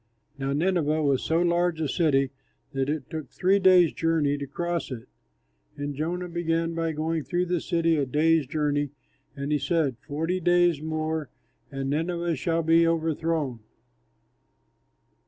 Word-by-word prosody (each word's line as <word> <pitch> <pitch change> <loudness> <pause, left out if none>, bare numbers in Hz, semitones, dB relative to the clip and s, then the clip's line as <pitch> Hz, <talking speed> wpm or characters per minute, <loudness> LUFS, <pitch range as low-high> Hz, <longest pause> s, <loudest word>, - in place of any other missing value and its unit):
Now 135 0 -1
Nineveh 155 -1 +1
was 140 -3 +2
so 165 +1 +1
large 175 -1 +1
a 155 - 0
city, 135 -3 +2 0.4
that 135 0 -1
it 150 -3 -2
took 155 -2 -5
three 195 +2 +2
days' 185 -3 +5
journey 160 -3 +1
to 140 - -5
cross 170 +4 -3
it. 115 -3 -7 0.7
And 145 0 -3
Jonah 170 +5 -3
began 165 -1 -1
by 165 -1 -1
going 160 +1 -2
through 175 +3 -1
the 175 -2 -1
city 165 -2 +1
a 140 -2 0
day's 155 +2 +2
journey, 145 0 0 0.5
and 140 +1 -4
he 150 - +2
said, 150 -8 0
"Forty 160 +5 -2
days 175 -3 +3
more 155 -1 -2 0.4
and 135 0 -3
Nineveh 170 +2 -1
shall 165 +3 0
be 165 +1 +4
overthrown." 160 -5 -1
160 Hz, 150 wpm, -26 LUFS, 145-170 Hz, 0.7 s, days